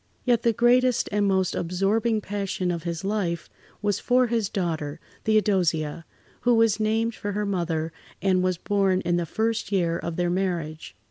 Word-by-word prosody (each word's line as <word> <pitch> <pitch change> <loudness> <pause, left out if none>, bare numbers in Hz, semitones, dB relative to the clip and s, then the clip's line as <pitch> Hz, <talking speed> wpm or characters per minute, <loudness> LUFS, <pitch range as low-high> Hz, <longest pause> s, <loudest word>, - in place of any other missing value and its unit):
Yet 240 -3 +3
the 235 - +3
greatest 245 +2 +3
and 205 -1 +2
most 190 -2 +1
absorbing 205 +6 0
passion 195 -3 -2
of 170 -1 -3
his 170 0 -4
life 190 -5 -2 0.3
was 205 -2 +1
for 250 0 +3
his 225 -4 0
daughter, 160 -5 -2 0.3
Theodosia, 175 -8 +1 0.3
who 245 -1 +3
was 225 -2 +3
named 225 +2 +1
for 205 -1 -4
her 210 +1 -1
mother 165 -4 -1 0.3
and 185 -2 +2
was 185 -1 +1
born 195 -1 +1
in 175 0 +1
the 170 -1 -1
first 220 +3 -1
year 170 -4 +1
of 170 -1 -4
their 175 0 0
marriage. 175 -4 -3
195 Hz, 170 wpm, -25 LUFS, 170-220 Hz, 0.3 s, Yet